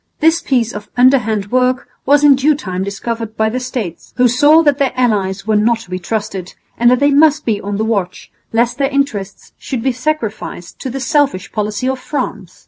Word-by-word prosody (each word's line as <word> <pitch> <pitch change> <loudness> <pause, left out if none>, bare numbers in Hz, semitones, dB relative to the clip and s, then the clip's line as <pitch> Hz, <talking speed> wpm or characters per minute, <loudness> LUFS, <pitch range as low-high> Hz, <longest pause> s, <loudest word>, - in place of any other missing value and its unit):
This 325 +2 +3
piece 240 -4 0
of 210 0 -8
underhand 225 -6 +3
work 255 0 +1 0.2
was 290 +1 +4
in 290 -1 +8
due 280 +3 +2
time 185 -9 -4
discovered 225 +3 -5
by 220 0 +2
the 250 +3 -2
States, 250 -8 -6
who 250 0 +5
saw 290 +7 +5
that 290 -2 +2
their 275 -3 +1
allies 200 -6 0
were 215 0 +1
not 225 +3 +3
to 185 - -15
be 185 - -3
trusted 195 -2 -4 0.2
and 240 +1 +4
that 250 0 +3
they 285 0 +3
must 300 +1 +4
be 210 -3 0
on 200 0 -4
the 220 - -1
watch 200 -5 -3 0.2
lest 235 +4 0
their 275 -1 +2
interests 255 -9 -3
should 255 -4 -4
be 265 - +2
sacrificed 240 - -4
to 265 - -5
the 270 +2 -4
selfish 270 -8 0
policy 210 +3 -2
of 265 0 -1
France. 215 - -5
240 Hz, 205 wpm, -16 LUFS, 210-275 Hz, 0.2 s, in